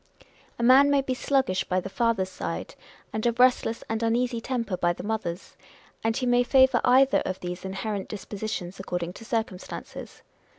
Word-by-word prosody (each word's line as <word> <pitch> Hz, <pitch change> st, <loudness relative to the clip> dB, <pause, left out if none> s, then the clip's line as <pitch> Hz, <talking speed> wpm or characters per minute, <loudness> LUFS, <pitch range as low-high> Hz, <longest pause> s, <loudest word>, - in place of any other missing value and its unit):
A 235 Hz, -, -3 dB
man 260 Hz, +4 st, +7 dB
anay 280 Hz, -1 st, +2 dB
be 260 Hz, -, 0 dB
sluggish 260 Hz, -7 st, +1 dB
by 185 Hz, 0 st, 0 dB
the 185 Hz, -, -6 dB
father's 205 Hz, -3 st, 0 dB
side, -, -, -5 dB, 0.4 s
and 215 Hz, 0 st, -2 dB
of 235 Hz, 0 st, -1 dB
a -, -, +8 dB
restless 245 Hz, -2 st, +2 dB
and 225 Hz, 0 st, -2 dB
uneasy 235 Hz, +1 st, 0 dB
temper 230 Hz, -6 st, -2 dB
by 175 Hz, -1 st, +1 dB
the -, -, -9 dB
mother's; 205 Hz, -5 st, -4 dB, 0.5 s
and 225 Hz, 0 st, 0 dB
he 255 Hz, -, -1 dB
may 245 Hz, 0 st, +4 dB
favour 260 Hz, 0 st, +4 dB
either 260 Hz, +2 st, +5 dB
of 185 Hz, -, -4 dB
these 180 Hz, 0 st, -6 dB
inherent 195 Hz, +1 st, -4 dB
dispositions 205 Hz, -3 st, -5 dB
according 180 Hz, -2 st, -4 dB
to 225 Hz, -, -11 dB
circumstances. 220 Hz, -5 st, -5 dB
225 Hz, 175 wpm, -26 LUFS, 190-250 Hz, 0.5 s, a